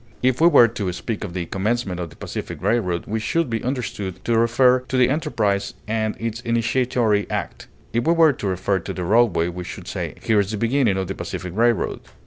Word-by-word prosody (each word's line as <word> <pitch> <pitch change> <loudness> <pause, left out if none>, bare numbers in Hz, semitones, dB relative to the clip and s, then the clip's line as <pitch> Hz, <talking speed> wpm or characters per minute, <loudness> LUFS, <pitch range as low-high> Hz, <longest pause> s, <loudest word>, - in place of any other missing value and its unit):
If 130 +1 +2
we 170 - +7
were 145 -8 +7
to 105 -5 -3
speak 110 +4 -4
of 95 -5 -6
the 90 -2 -2
commencement 100 0 -2
of 85 -2 -4
the - - -16
Pacific - - -6
Railroad, 95 -5 0
we 110 +2 -2
should 130 +5 0
be 115 - -2
understood 115 -7 -4
to 120 - +2
refer 125 +3 +4
to 130 - -1
the 125 -1 +4
enterprise 110 -10 0
and 110 0 -1
its 115 0 -3
initiatory 115 -2 +1
act; - - -4 0.3
if 120 +5 0
we 165 - +5
were 165 -3 +5
to 105 - -4
refer 95 +1 0
to - - -6
the 90 - -4
roadway 105 -3 +3
we 90 +1 -5
should - - -8
say - - -4
"Here 110 -3 +3
is 100 -1 0
the 110 - -3
beginning 115 -2 +2
of 95 - -1
the 95 - -3
Pacific 90 -2 -6
Railroad." 115 -2 +1
115 Hz, 215 wpm, -22 LUFS, 95-120 Hz, 0.3 s, we